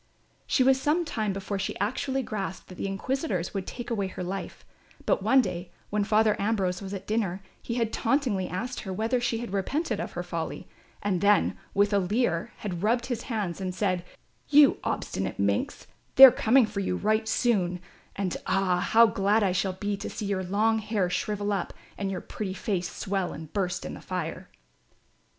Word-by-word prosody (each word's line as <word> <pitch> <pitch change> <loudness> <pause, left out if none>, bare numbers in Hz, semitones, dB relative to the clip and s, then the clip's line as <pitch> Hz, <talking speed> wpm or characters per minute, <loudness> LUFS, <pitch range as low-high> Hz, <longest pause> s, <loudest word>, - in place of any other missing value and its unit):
She 260 - +3
was 265 0 +4
some 320 +5 +2
time 215 -8 -1
before 195 +1 -3
she 190 - -3
actually 260 +6 -1
grasped 195 -4 -5
that 185 - -9
the - - -1
inquisitors 195 - -2
would 195 -2 -3
take 240 -1 -6
away 200 -4 0
her 185 -1 -6
life; 195 +2 -5 0.4
but - - +2
one 265 0 +5
day 180 -4 -4 0.2
when 210 0 +1
Father 215 +1 +3
Ambrose 195 -4 0
was 195 -1 -6
at 195 -2 -5
dinner 200 -4 -1 0.2
he 235 - -4
had 230 -2 0
tauntingly 230 -7 +1
asked 240 +8 -4
her 190 - -6
whether 225 +6 0
she 240 -1 0
had 230 -3 -6
repented 265 - -1
of - - -4
her - - -3
folly; - - -5 0.4
and 190 -4 0
then, 205 0 +4 0.2
with 205 +1 +3
a 200 - +4
leer, 190 -2 0
had 180 -5 -4
rubbed 235 +4 +2
his 245 -3 -3
hands 200 -6 -2
and 185 -1 -3
said: 185 -3 0 0.5
"You 290 -1 +6
obstinate - - -2
minx, - - -1 0.3
they 270 - +13
are 260 - +9
coming 240 +2 +4
for 210 -1 -5
you 190 -2 -1
right 215 +3 +1
soon 190 -7 +1 0.4
and 190 -3 -2
ah, 185 -2 +2
how 225 +5 +6
glad 210 0 +2
I 190 - +2
shall 185 +1 0
be 205 +2 -2
to 200 - -5
see 215 - -5
your 200 -2 -1
long 215 +4 +2
hair 205 -4 -1
shrivel 205 +1 -1
up 195 -3 -3 0.2
and 200 -1 -3
your 190 -2 -3
pretty 195 -3 -5
face 185 -4 -2
swell 190 -2 -2
and 155 -1 -9
burst 180 -3 -1
in - - -5
the - - -9
fire." 180 0 -4
205 Hz, 195 wpm, -27 LUFS, 185-225 Hz, 0.5 s, they